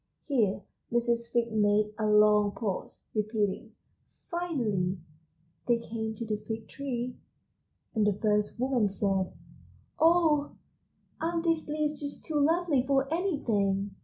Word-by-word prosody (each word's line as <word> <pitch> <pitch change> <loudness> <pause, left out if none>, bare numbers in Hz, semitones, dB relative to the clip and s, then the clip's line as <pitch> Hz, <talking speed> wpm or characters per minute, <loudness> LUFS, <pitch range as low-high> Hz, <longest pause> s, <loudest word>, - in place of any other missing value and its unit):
Here 230 -9 +1 0.3
Mrs. 235 0 +1
Fig 235 -1 +1
made 210 0 +2
a 215 - +1
long 210 -1 +5
pause, 205 -5 -4
repeating, 215 +1 -1 0.6
"Finally 230 - -1 0.7
they 240 -1 +4
came 220 -1 -4
to 230 - -5
the 215 -1 -1
Fig 220 +1 -6
tree. 250 -3 -4 0.8
And 215 -3 +2
the 205 - +3
first 210 +2 0
woman 250 -5 +2
said: 195 -1 0 0.7
'Oh, 320 -3 +4 0.7
aren't 330 +1 0
these 330 -3 0
leaves 300 0 -1
just 285 -1 -7
too 305 -2 0
lovely 315 -2 +3
for 270 -1 +2
anything! 205 - 0
230 Hz, 125 wpm, -29 LUFS, 210-285 Hz, 0.8 s, long